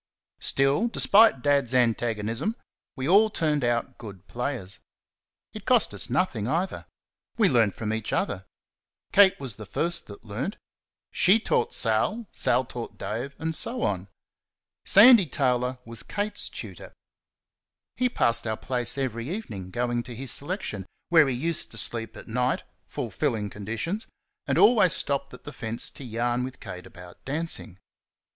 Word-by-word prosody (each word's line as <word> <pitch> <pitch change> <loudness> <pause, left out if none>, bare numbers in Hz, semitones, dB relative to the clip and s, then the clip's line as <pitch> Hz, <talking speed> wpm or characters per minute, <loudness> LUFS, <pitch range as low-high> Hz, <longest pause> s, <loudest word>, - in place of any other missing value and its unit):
Still, 135 +11 +1
despite 215 - +4
Dad's 140 -4 +2
antagonism, 115 - 0 0.4
we 130 -1 -3
all 205 +5 +5
turned 150 -7 0
out 120 -1 -1
good 100 -5 -10
players. 120 - -4 0.7
It - - -10
cost - - +4
us - - 0
nothing 105 0 0
either. 170 +8 -2 0.5
We 220 -4 +4
learnt 115 - +2
from 110 -1 -3
each 110 0 -3
other. 95 -1 -2 0.6
Kate 195 -2 +6
was 130 -7 -3
the 110 - -8
first 170 - -1
that 100 +2 -12
learnt. 125 - -4 0.5
SHE 200 +5 +4
taught 460 - 0
Sal. 230 +2 0
Sal 130 - +1
taught 120 -1 -7
Dave, 125 +6 -5
and 160 0 -2
so 245 +7 0
on. 95 -1 -1 0.8
Sandy 215 -2 +8
Taylor 125 -2 0
was 115 0 -4
Kate's 205 0 -3
tutor. - - -9 1.0
He 250 0 +1
passed 115 - 0
our 110 0 -2
place 125 0 -1
every 125 -2 -3
evening 110 - -6
going 120 +3 -1
to 120 0 -9
his 130 +1 0
selection, 140 - -4 0.2
where 160 -4 +6
he 130 - -1
used 160 +6 0
to 115 - -9
sleep 115 0 +1
at - - -11
night 125 +2 0 0.2
(fulfilling 115 -4 -2
conditions), 115 - -4 0.4
and - - +1
always 210 -8 +6
stopped 140 -1 0
at - - -16
the 145 - -8
fence 115 -2 -1
to - - -10
yarn 120 +1 -1
with 130 0 -7
Kate 90 0 -9
about 90 0 -14
dancing. 140 - -3
125 Hz, 150 wpm, -26 LUFS, 115-165 Hz, 1.0 s, Sandy